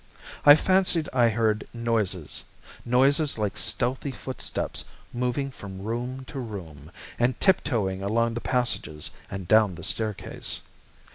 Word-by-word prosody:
I 145 Hz, -, +12 dB
fancied 180 Hz, -2 st, +2 dB
I 120 Hz, -2 st, +4 dB
heard 110 Hz, -1 st, 0 dB
noises, 105 Hz, -, -1 dB, 0.4 s
noises 135 Hz, +4 st, +3 dB
like 105 Hz, -3 st, -1 dB
stealthy 130 Hz, +3 st, +1 dB
footsteps 130 Hz, -1 st, -3 dB, 0.3 s
moving 125 Hz, +3 st, -1 dB
from 95 Hz, -5 st, -9 dB
room 125 Hz, +4 st, -4 dB
to 135 Hz, -, -7 dB
room, 85 Hz, -, -8 dB, 0.3 s
and 120 Hz, +1 st, +1 dB
tiptoeing 105 Hz, -, +1 dB
along 115 Hz, +4 st, +1 dB
the 120 Hz, -, -4 dB
passages 120 Hz, -, -1 dB, 0.2 s
and 95 Hz, -2 st, -6 dB
down 110 Hz, -3 st, +4 dB
the 90 Hz, -, -9 dB
staircase. 110 Hz, +1 st, -1 dB
115 Hz, 125 wpm, -26 LUFS, 100-130 Hz, 0.4 s, I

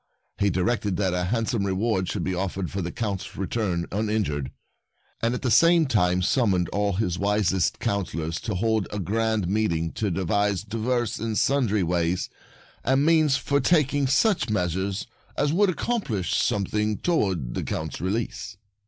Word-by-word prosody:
He 100 Hz, -, +3 dB
directed 100 Hz, +1 st, 0 dB
that 95 Hz, -3 st, 0 dB
a 90 Hz, 0 st, 0 dB
handsome 115 Hz, +1 st, 0 dB
re 95 Hz, -1 st, 0 dB
ward 95 Hz, -2 st, 0 dB
should 95 Hz, -, -2 dB
be 95 Hz, -, -1 dB
offered 95 Hz, 0 st, -3 dB
for 100 Hz, -, -3 dB
the 90 Hz, 0 st, -3 dB
Count's 105 Hz, -4 st, -4 dB
return 95 Hz, -3 st, -1 dB
uninjured, 100 Hz, -10 st, -1 dB, 0.7 s
and 115 Hz, +2 st, +1 dB
at -, -, -6 dB
the 125 Hz, -, +1 dB
same 165 Hz, +7 st, +5 dB
time 90 Hz, -7 st, +2 dB
summoned 95 Hz, -6 st, +2 dB
all 100 Hz, 0 st, 0 dB
his 90 Hz, -2 st, -1 dB
wisest 100 Hz, -3 st, +1 dB
councilors 85 Hz, -5 st, -2 dB
to -, -, -3 dB
hold 110 Hz, +1 st, +1 dB
a 105 Hz, -, -4 dB
grand 110 Hz, +1 st, 0 dB
meeting 85 Hz, -5 st, 0 dB
to 105 Hz, -, -2 dB
devise 100 Hz, +2 st, 0 dB
divers 115 Hz, +2 st, -1 dB
and 110 Hz, 0 st, -2 dB
sundry 125 Hz, -8 st, +2 dB
ways 85 Hz, +1 st, 0 dB, 0.5 s
and 135 Hz, +3 st, +2 dB
means 155 Hz, -4 st, +4 dB
for 140 Hz, 0 st, 0 dB
taking 145 Hz, -2 st, +2 dB
such 145 Hz, -, +2 dB
measures 95 Hz, 0 st, -1 dB, 0.3 s
as 145 Hz, +1 st, +1 dB
would 200 Hz, +3 st, +4 dB
accomplish 165 Hz, -, -1 dB
something 105 Hz, +1 st, 0 dB
toward 95 Hz, -, 0 dB
the -, -, -2 dB
Count's 80 Hz, 0 st, -4 dB
release. 105 Hz, +2 st, -3 dB
105 Hz, 160 wpm, -25 LUFS, 90-115 Hz, 0.7 s, same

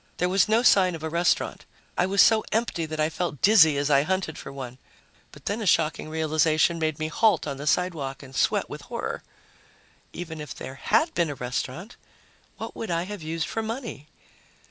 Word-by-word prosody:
There 180 Hz, -, +1 dB
was 195 Hz, +2 st, +3 dB
no 225 Hz, +2 st, +3 dB
sign 185 Hz, -7 st, +5 dB
of 160 Hz, -, -9 dB
a 160 Hz, -, -3 dB
restaurant. 170 Hz, +2 st, 0 dB, 0.3 s
I 180 Hz, -, +2 dB
was 195 Hz, 0 st, +5 dB
so 220 Hz, -1 st, +4 dB
empty 215 Hz, -7 st, -1 dB
that 155 Hz, 0 st, -5 dB
I 155 Hz, -, +3 dB
felt 160 Hz, -3 st, -3 dB
dizzy 170 Hz, -9 st, +6 dB
as 145 Hz, +1 st, 0 dB
I 140 Hz, -1 st, +6 dB
hunted 185 Hz, 0 st, -1 dB
for -, -, -8 dB
one. 130 Hz, -2 st, -8 dB, 0.5 s
But 145 Hz, -, -16 dB
then 210 Hz, +3 st, -2 dB
a 210 Hz, -, -2 dB
shocking 155 Hz, -2 st, +2 dB
realization 155 Hz, +1 st, +2 dB
made 155 Hz, -2 st, -1 dB
me 155 Hz, -, -2 dB
halt 195 Hz, +1 st, +2 dB
on 140 Hz, -2 st, -4 dB
the 145 Hz, +2 st, -6 dB
sidewalk 150 Hz, -6 st, -1 dB
and 135 Hz, 0 st, -12 dB
sweat -, -, +1 dB
with -, -, -8 dB
horror. -, -, -5 dB, 0.9 s
Even 160 Hz, -3 st, -7 dB
if 150 Hz, -, -7 dB
there 130 Hz, -, -7 dB, 0.2 s
had 320 Hz, +1 st, +3 dB
been 170 Hz, -3 st, +1 dB
a 145 Hz, -, -4 dB
restaurant, 130 Hz, -, -5 dB, 0.6 s
what -, -, -7 dB
would 225 Hz, -, -5 dB
I 170 Hz, 0 st, 0 dB
have 205 Hz, 0 st, -7 dB
used 160 Hz, 0 st, -3 dB
for 225 Hz, -, -2 dB
money? 225 Hz, -, -6 dB
160 Hz, 200 wpm, -26 LUFS, 150-190 Hz, 0.9 s, dizzy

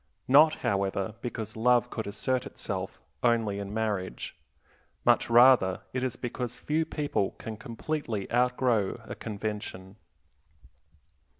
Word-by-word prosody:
Not, 150 Hz, +4 st, +7 dB
however, 100 Hz, +1 st, 0 dB
because 110 Hz, -3 st, -5 dB
love 120 Hz, +1 st, +3 dB
could 110 Hz, -, -4 dB
assert 130 Hz, +5 st, -1 dB
itself 95 Hz, -7 st, -5 dB, 0.2 s
only 115 Hz, -4 st, +2 dB
in 100 Hz, 0 st, -5 dB
marriage; 105 Hz, -, -3 dB, 0.7 s
much -, -, +4 dB
rather 120 Hz, -6 st, +6 dB
is 130 Hz, -1 st, -1 dB
it -, -, -21 dB
because 125 Hz, 0 st, -4 dB
few 160 Hz, +2 st, 0 dB
people 145 Hz, -11 st, -1 dB
can 110 Hz, -, -6 dB
completely 115 Hz, -2 st, -4 dB
outgrow 125 Hz, -4 st, +2 dB
a -, -, -6 dB
convention. 105 Hz, -2 st, -6 dB
115 Hz, 115 wpm, -28 LUFS, 100-125 Hz, 0.7 s, Not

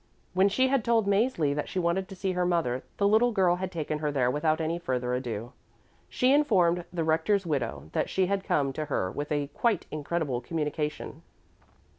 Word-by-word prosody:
When 190 Hz, +2 st, +4 dB
she 260 Hz, +6 st, +2 dB
had 270 Hz, -3 st, +2 dB
told 230 Hz, -2 st, +2 dB
Mäzli 200 Hz, -, +2 dB
that 150 Hz, -, -3 dB
she -, -, -5 dB
wanted 180 Hz, +2 st, 0 dB
to 195 Hz, -, -8 dB
see 190 Hz, +1 st, -2 dB
her 180 Hz, 0 st, 0 dB
mother, 165 Hz, -8 st, 0 dB, 0.2 s
the 200 Hz, -, +3 dB
little 220 Hz, +4 st, +4 dB
girl 185 Hz, -5 st, +3 dB
had 185 Hz, 0 st, -4 dB
taken 155 Hz, -3 st, -3 dB
her 150 Hz, -1 st, -1 dB
there 125 Hz, -3 st, +1 dB
without 155 Hz, +2 st, +1 dB
any 165 Hz, +2 st, -1 dB
further 125 Hz, -6 st, -2 dB
ado. 120 Hz, -2 st, -4 dB, 0.6 s
She 255 Hz, +2 st, +3 dB
informed 180 Hz, -, +3 dB
the 170 Hz, -2 st, -2 dB
Rector's 180 Hz, +5 st, +1 dB
widow 130 Hz, -, -3 dB
that -, -, 0 dB
she 190 Hz, -, +1 dB
had 195 Hz, +1 st, -1 dB
come 140 Hz, -6 st, 0 dB
to 155 Hz, +3 st, -3 dB
her 95 Hz, -10 st, -1 dB
with 145 Hz, +1 st, -5 dB
a 145 Hz, -1 st, +1 dB
quite 230 Hz, -7 st, +1 dB
incredible 150 Hz, -4 st, -2 dB
communication. 150 Hz, +1 st, -3 dB
170 Hz, 195 wpm, -28 LUFS, 145-195 Hz, 0.6 s, When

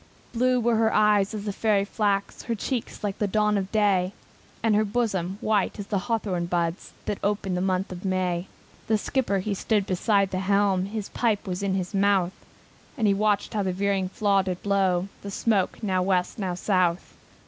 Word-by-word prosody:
Blue 250 Hz, +1 st, +2 dB
were 235 Hz, -1 st, +2 dB
her 220 Hz, 0 st, +3 dB
eyes 210 Hz, -2 st, +3 dB
as 205 Hz, -1 st, -5 dB
the 205 Hz, -, -2 dB
fairy 205 Hz, -1 st, +2 dB
flax, 200 Hz, -1 st, -1 dB
Her 235 Hz, -, -2 dB
cheeks 235 Hz, +2 st, -4 dB
like 200 Hz, -2 st, -2 dB
the 210 Hz, -, +1 dB
dawn 210 Hz, +1 st, +2 dB
of 195 Hz, -1 st, -2 dB
day, 200 Hz, -3 st, +2 dB, 0.5 s
And 225 Hz, -1 st, +3 dB
her 215 Hz, -, +4 dB
bosom 200 Hz, -4 st, -1 dB
white 215 Hz, -3 st, +1 dB
as 205 Hz, -, -5 dB
the 200 Hz, -1 st, -1 dB
hawthorn 195 Hz, -6 st, -1 dB
buds 170 Hz, 0 st, -2 dB
The 205 Hz, -, -2 dB
ope 205 Hz, 0 st, 0 dB
in 190 Hz, -, -1 dB
the 180 Hz, -, -1 dB
month 190 Hz, 0 st, 0 dB
of 180 Hz, 0 st, -7 dB
May. 185 Hz, -2 st, -1 dB, 0.4 s
The 220 Hz, -, +3 dB
skipper 220 Hz, -2 st, 0 dB
he 200 Hz, +2 st, -2 dB
stood 205 Hz, +1 st, 0 dB
beside 195 Hz, +1 st, +1 dB
the 185 Hz, -, -1 dB
helm, 195 Hz, -1 st, +2 dB
His 210 Hz, -1 st, -5 dB
pipe 220 Hz, -4 st, 0 dB
was 185 Hz, -1 st, -3 dB
in 195 Hz, -1 st, 0 dB
his 185 Hz, +1 st, -3 dB
mouth, 195 Hz, -2 st, +2 dB, 0.6 s
And 225 Hz, -, +1 dB
he 200 Hz, -, +4 dB
watched 205 Hz, 0 st, +1 dB
how 210 Hz, -, 0 dB
the 190 Hz, -2 st, -1 dB
veering 195 Hz, 0 st, 0 dB
flaw 200 Hz, -1 st, +2 dB
did 185 Hz, -1 st, -4 dB
blow 190 Hz, -2 st, +1 dB
The 200 Hz, -, -6 dB
smoke 200 Hz, +1 st, 0 dB
now 185 Hz, -3 st, +1 dB
West, 180 Hz, +2 st, 0 dB
now 185 Hz, -3 st, -2 dB
South. 180 Hz, -2 st, 0 dB
200 Hz, 200 wpm, -26 LUFS, 185-210 Hz, 0.6 s, her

